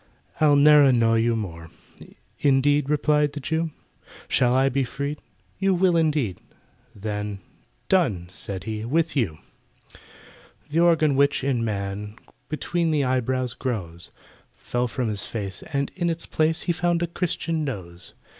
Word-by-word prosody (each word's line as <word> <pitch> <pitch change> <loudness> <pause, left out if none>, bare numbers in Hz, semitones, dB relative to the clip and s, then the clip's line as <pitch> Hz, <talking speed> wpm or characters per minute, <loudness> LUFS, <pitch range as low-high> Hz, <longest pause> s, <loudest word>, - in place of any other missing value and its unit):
"I'll 150 -2 +5
ne'er 150 +1 +7
annoy 115 -4 +4
you 115 +1 +2
more." 85 -6 -6 0.7
"Indeed?" 145 +1 +3
replied 150 0 +2
the 150 - -5
Jew; 160 +4 -1 0.6
"Shall 125 0 +2
I 135 +1 +4
be 135 +1 +1
freed?" 140 +4 -4 0.4
"You 195 -1 +2
will, 180 -1 +3
indeed!" 150 - +1 0.5
Then 105 -1 -4 0.5
"Done!" 125 - +2
said 95 -1 -5
he, 110 0 -4
"with 160 +7 0
you!" 105 - 0 1.3
The 160 - +2
organ 160 -4 +4
which, 140 0 +2
in 130 -4 0
man, 105 -1 -4 0.3
Between 165 +2 -1
the 150 -3 +2
eyebrows 130 -1 0
grows, 90 -9 -4 0.5
Fell 125 0 -2
from 125 0 -2
his 105 -2 -1
face, 100 -4 -5
and 140 -1 -1
in 175 -2 0
its 165 0 -3
place 160 +1 +1
He - - 0
found 175 0 0
a - - +3
Christian 165 -2 -2
nose. 90 -11 -6
135 Hz, 145 wpm, -24 LUFS, 110-155 Hz, 1.3 s, ne'er